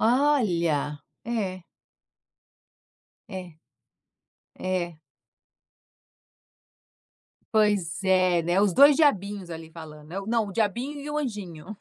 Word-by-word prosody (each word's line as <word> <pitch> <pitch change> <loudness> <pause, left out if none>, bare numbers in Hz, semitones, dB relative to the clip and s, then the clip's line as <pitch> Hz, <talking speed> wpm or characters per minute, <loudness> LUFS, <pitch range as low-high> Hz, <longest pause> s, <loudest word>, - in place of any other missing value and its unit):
Olha, 185 - +2 0.3
é. 195 -6 -3 1.7
É 180 -5 -8 1.0
é. 175 -3 -2 2.5
Pois 200 -5 +2
é, 185 -2 +3
né, 175 +4 +2
os 205 -3 +3
2 285 +5 +7
diabinhos 205 - +1
ali 160 -1 -8
falando 155 -1 -11
é, 195 - -3
não, 225 -2 +1
o 200 - -7
diabinho 240 +7 -1
e 295 +1 -6
o 300 - -1
anjinho. 205 - -6
190 Hz, 95 wpm, -26 LUFS, 170-225 Hz, 2.5 s, 2